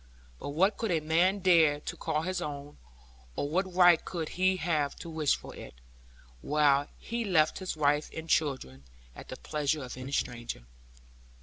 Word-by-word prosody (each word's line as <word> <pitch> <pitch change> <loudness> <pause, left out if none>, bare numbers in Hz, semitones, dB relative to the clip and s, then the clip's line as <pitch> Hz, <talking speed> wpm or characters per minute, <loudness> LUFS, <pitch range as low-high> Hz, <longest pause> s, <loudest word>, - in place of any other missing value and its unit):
But - - -6
what 185 +9 +2
could 225 - -2
a 170 -3 +2
man 175 +6 +2
dare 165 -5 +4
to - - -5
call 155 +1 -2
his 185 0 -2
own, 145 -2 -7 0.6
or - - -2
what 185 +5 -1
right 175 -2 +5
could 165 -3 -4
he 185 +1 +1
have 155 -5 0
to 170 - -9
wish 155 -3 +2
for - - -11
it, - - -10 0.7
while 145 - +3
he 235 0 -4
left 165 -7 +2
his 185 -4 -4
wife 150 0 +2
and 160 0 -7
children 130 - -1 0.3
at - - -11
the - - -6
pleasure 150 -1 -2
of 125 0 -8
any 130 +1 -7
stranger? 120 - -3
155 Hz, 175 wpm, -29 LUFS, 145-180 Hz, 0.7 s, right